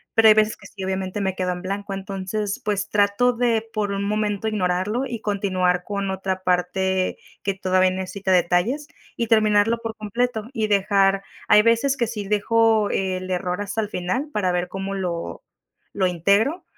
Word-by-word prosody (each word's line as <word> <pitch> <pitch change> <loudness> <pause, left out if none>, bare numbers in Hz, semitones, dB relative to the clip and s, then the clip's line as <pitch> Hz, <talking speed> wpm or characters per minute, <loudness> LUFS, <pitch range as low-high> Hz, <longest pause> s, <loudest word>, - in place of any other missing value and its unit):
pero 225 0 +6
hay 215 - +9
veces 215 0 +3
que - - -13
sí 195 - -9
obviamente 190 +1 -3
me 190 -1 0
quedo 185 -1 -1
en 180 +1 -8
blanco, 200 +1 -4
entonces 195 +1 -4
pues 205 -1 -1
trato 205 +4 +3
de 230 -2 0
por 210 -2 -1
un 200 0 -2
momento 210 0 -1
ignorarlo 205 +4 0
y 235 -3 -5
continuar 185 -4 0
con 200 0 -3
otra 190 0 -3
parte 185 +1 0 0.3
que 195 0 -1
todavía 185 -1 +2
necesita 190 +1 -3
detalles 185 - +2 0.3
y 235 - 0
terminarlo 215 +1 +3
por 225 -1 -5
completo 220 +1 -2
y 220 -4 0
dejar 195 -1 +2 0.2
hay 210 - +6
veces 230 +4 +2
que 235 - +1
sí 210 -3 -5
dejo 220 +1 +3
el 185 -1 -2
error 180 +1 -2
hasta 205 +2 -2
el 210 - -4
final 210 +11 -2
para 195 -7 0
ver 180 0 -1
cómo 195 +2 -5
lo 175 -3 -4 0.5
lo 195 - +1
integro, 200 - +1
200 Hz, 175 wpm, -23 LUFS, 185-215 Hz, 0.5 s, hay